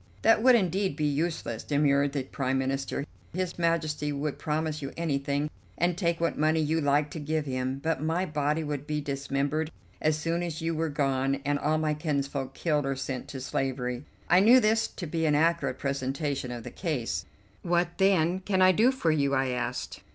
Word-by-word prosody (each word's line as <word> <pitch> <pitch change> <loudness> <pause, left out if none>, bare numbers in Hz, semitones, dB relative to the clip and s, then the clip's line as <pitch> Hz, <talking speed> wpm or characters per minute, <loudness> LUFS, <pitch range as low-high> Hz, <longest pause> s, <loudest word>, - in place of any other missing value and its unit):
"That 225 -1 +5
would 255 +1 +7
indeed 190 -4 +1
be 155 0 -1
useless," 145 -5 -1
demurred 140 -1 +2
the 140 -2 -1
Prime 130 0 -1
Minister; 135 +1 -2 0.3
"His 185 -1 -2
Majesty 155 -3 0
would 145 0 -3
promise 155 0 -2
you 140 - -4
anything 145 -2 0 0.3
and 175 0 +1
take 170 -2 0
what 170 0 0
money 155 +1 +3
you 160 +1 +1
liked 145 +1 +2
to 160 - -5
give 155 +1 -1
him; 130 0 -2
but 160 0 -1
my 165 +4 0
body 150 0 0
would 145 -1 -4
be 150 0 -1
dismembered 140 +2 -1 0.3
as 155 0 +2
soon 165 +3 -1
as 170 -2 -3
you 165 0 -1
were 160 0 -1
gone, 135 -2 +1
and 145 0 +1
all 155 +2 +1
my 155 -1 +1
kinsfolk 140 -3 -2
killed 150 -3 +1
or 135 - 0
sent 135 0 -4
to 140 -2 -6
slavery." 125 -1 -2 0.2
I 175 +2 +6
knew 235 +6 +7
this 225 -1 +2
to 180 - -7
be 160 0 -1
an 150 - +3
accurate 165 +2 +2
presentation 140 0 -2
of 120 -1 -6
the - - -7
case. 115 - -2 0.4
"What, 175 0 0
then, 185 -2 +3
can 190 0 -1
I 185 0 +7
do 225 +8 +4
for 215 -12 +1
you?" 140 -3 +2
I 135 0 +1
asked. 125 0 -3
150 Hz, 195 wpm, -28 LUFS, 140-165 Hz, 0.4 s, would